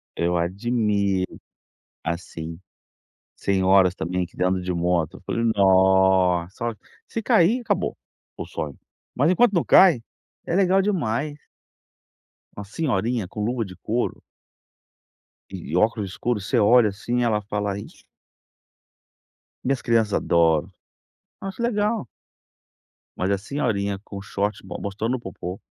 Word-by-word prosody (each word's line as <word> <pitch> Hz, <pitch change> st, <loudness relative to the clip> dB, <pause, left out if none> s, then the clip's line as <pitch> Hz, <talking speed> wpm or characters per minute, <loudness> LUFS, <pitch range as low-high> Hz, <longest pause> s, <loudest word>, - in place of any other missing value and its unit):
Eu 85 Hz, +1 st, 0 dB
admiro, 100 Hz, 0 st, 0 dB, 0.6 s
assim, 85 Hz, -1 st, -5 dB, 0.8 s
senhoras 95 Hz, -1 st, +3 dB
também 90 Hz, +2 st, -2 dB
que 85 Hz, -, -18 dB
ainda 90 Hz, -, +1 dB
andam 95 Hz, 0 st, 0 dB
de 90 Hz, 0 st, -3 dB
moto, 85 Hz, -2 st, 0 dB
eu -, -, -16 dB
falei: 115 Hz, -, -1 dB
"Nossa, 95 Hz, 0 st, +3 dB
ó", 115 Hz, -1 st, -2 dB, 0.3 s
se 225 Hz, -, -4 dB
cair, 225 Hz, +1 st, +3 dB
acabou 235 Hz, -, -1 dB, 0.4 s
o -, -, -5 dB
sonho, 75 Hz, -3 st, -5 dB, 0.4 s
mas 145 Hz, +6 st, +3 dB
enquanto 230 Hz, +3 st, +4 dB
não 170 Hz, -, +2 dB
cai, 175 Hz, -11 st, +6 dB, 0.4 s
é 170 Hz, -, -1 dB
legal 190 Hz, 0 st, +4 dB
demais! 150 Hz, -, -1 dB, 1.2 s
Uma 105 Hz, -, -6 dB
senhorinha 115 Hz, -, -1 dB
com 105 Hz, +3 st, -5 dB
luva 120 Hz, +1 st, -1 dB
de 95 Hz, -2 st, -10 dB
couro 115 Hz, +7 st, -2 dB, 1.3 s
e 90 Hz, -4 st, -6 dB
óculos 105 Hz, -1 st, +1 dB
escuro, 120 Hz, +2 st, -1 dB
você 120 Hz, +5 st, 0 dB
olha, 110 Hz, +1 st, +5 dB
assim, 120 Hz, +5 st, -2 dB
ela 110 Hz, -3 st, +1 dB
fala: 105 Hz, -1 st, -2 dB
"Isso" -, -, -12 dB, 1.6 s
minhas 135 Hz, 0 st, 0 dB
crianças 115 Hz, -3 st, +2 dB
adoram, 85 Hz, 0 st, +2 dB, 0.7 s
eu 195 Hz, -, -5 dB
acho 195 Hz, +4 st, -6 dB
legal. 215 Hz, -, 0 dB, 1.1 s
Mas 95 Hz, +2 st, 0 dB
a 100 Hz, -, +2 dB
senhorinha 100 Hz, -5 st, -2 dB
com 100 Hz, -1 st, -7 dB
short 100 Hz, +1 st, -3 dB
mo 95 Hz, -, -7 dB
mostrando 110 Hz, +5 st, -2 dB
o -, -, -10 dB
popô 95 Hz, -3 st, -7 dB
105 Hz, 130 wpm, -23 LUFS, 95-125 Hz, 1.6 s, cai